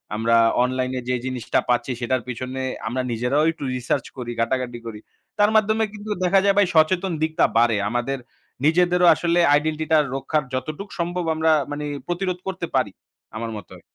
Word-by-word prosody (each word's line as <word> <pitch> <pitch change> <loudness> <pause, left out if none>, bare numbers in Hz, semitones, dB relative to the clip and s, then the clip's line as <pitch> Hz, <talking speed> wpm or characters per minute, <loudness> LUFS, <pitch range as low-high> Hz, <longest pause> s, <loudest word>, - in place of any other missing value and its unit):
আমরা 115 +1 +2 0.3
অনলাইনে 130 0 -1
যে, 125 - +1
জিনিসটা 130 -3 -1
পাচ্ছি 125 +2 +1
সেটার 130 +1 0
পিছনে 130 +2 -5 0.3
আমরা 130 +3 -1
নিজেরাও 125 +7 +1
একটু 160 - -10
research 125 0 -2
করি, 120 -1 -5
ঘাটাঘাটি 120 0 -1
করি। 110 -2 -7 0.4
তার 205 +1 +5
মাধ্যমে 215 +1 +3
কিন্তু 210 +1 -9
দেখা 190 +2 +4
যায় 200 0 +4
ভাই 205 - +6
সচেতন 175 +4 +3
দিকটা 160 0 +1
বাড়ে। 115 -2 +4
আমাদের 120 +3 -1 0.5
নিজেদেরও 180 +2 +4
আসলে 170 0 +1
আইডেন্টিটিটা 155 +1 +2 0.2
রক্ষার 150 +2 -1
যতটুকু 155 +10 -4
সম্ভব 175 +1 -1
আমরা 160 0 +2 0.2
মানে 150 0 -4 0.2
প্রতিরোধ 180 +1 -2
করতে 185 -2 -3
পারি 125 -7 +1 0.4
আমার 115 0 -4
মতে। 100 - -12
145 Hz, 160 wpm, -23 LUFS, 125-175 Hz, 0.5 s, ভাই